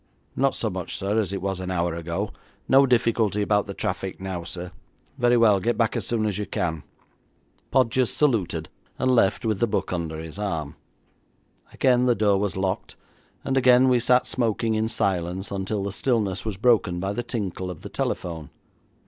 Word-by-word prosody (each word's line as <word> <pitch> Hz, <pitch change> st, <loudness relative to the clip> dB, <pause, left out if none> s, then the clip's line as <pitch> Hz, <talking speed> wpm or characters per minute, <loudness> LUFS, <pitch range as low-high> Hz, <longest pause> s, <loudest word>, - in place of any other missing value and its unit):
'Not 135 Hz, 0 st, +2 dB
so 110 Hz, -, -1 dB
much, 90 Hz, -2 st, -4 dB
sir, 100 Hz, +3 st, 0 dB
as 100 Hz, -4 st, -1 dB
it 95 Hz, -2 st, -4 dB
was 95 Hz, -1 st, -2 dB
an 95 Hz, 0 st, -4 dB
hour 85 Hz, -2 st, 0 dB
ago. 85 Hz, +5 st, -3 dB, 0.4 s
No 135 Hz, +1 st, +6 dB
difficulty 115 Hz, -4 st, +2 dB
about 105 Hz, 0 st, +1 dB
the 100 Hz, -, -6 dB
traffic 95 Hz, +1 st, -3 dB
now, 95 Hz, -2 st, -4 dB
sir.' 90 Hz, 0 st, -6 dB, 0.5 s
'Very 120 Hz, 0 st, +4 dB
well, 110 Hz, -4 st, +5 dB
get 120 Hz, +6 st, 0 dB
back 115 Hz, -2 st, +1 dB
as -, -, -3 dB
soon 115 Hz, -2 st, 0 dB
as 105 Hz, -2 st, -1 dB
you 105 Hz, -, -3 dB
can.' 80 Hz, -3 st, -2 dB, 0.9 s
Podgers 130 Hz, -1 st, +2 dB
saluted, 95 Hz, -, 0 dB, 0.3 s
and 130 Hz, 0 st, +2 dB
left 110 Hz, -2 st, +2 dB
with 110 Hz, -3 st, 0 dB
the 120 Hz, -, +2 dB
book 105 Hz, -3 st, -2 dB
under 80 Hz, -3 st, -3 dB
his 80 Hz, +4 st, -8 dB
arm. 80 Hz, -8 st, -3 dB, 1.0 s
Again 125 Hz, -1 st, +3 dB
the 120 Hz, -, +4 dB
door 100 Hz, -2 st, +2 dB
was 100 Hz, -2 st, -1 dB
locked, 95 Hz, 0 st, -2 dB, 0.5 s
and 135 Hz, -, 0 dB
again 125 Hz, 0 st, +5 dB
we 125 Hz, -1 st, +4 dB
sat 125 Hz, +1 st, +3 dB
smoking 115 Hz, -2 st, 0 dB
in 110 Hz, 0 st, +1 dB
silence 95 Hz, -3 st, -1 dB
until 100 Hz, +1 st, -2 dB
the 100 Hz, -, -3 dB
stillness 105 Hz, -4 st, -1 dB
was 105 Hz, -4 st, -3 dB
broken 105 Hz, -5 st, +2 dB
by 95 Hz, +2 st, -2 dB
the 120 Hz, -, -2 dB
tinkle 100 Hz, -6 st, -4 dB
of 90 Hz, -4 st, -8 dB
the -, -, -8 dB
telephone. 80 Hz, -4 st, -3 dB
100 Hz, 185 wpm, -25 LUFS, 90-115 Hz, 1.0 s, No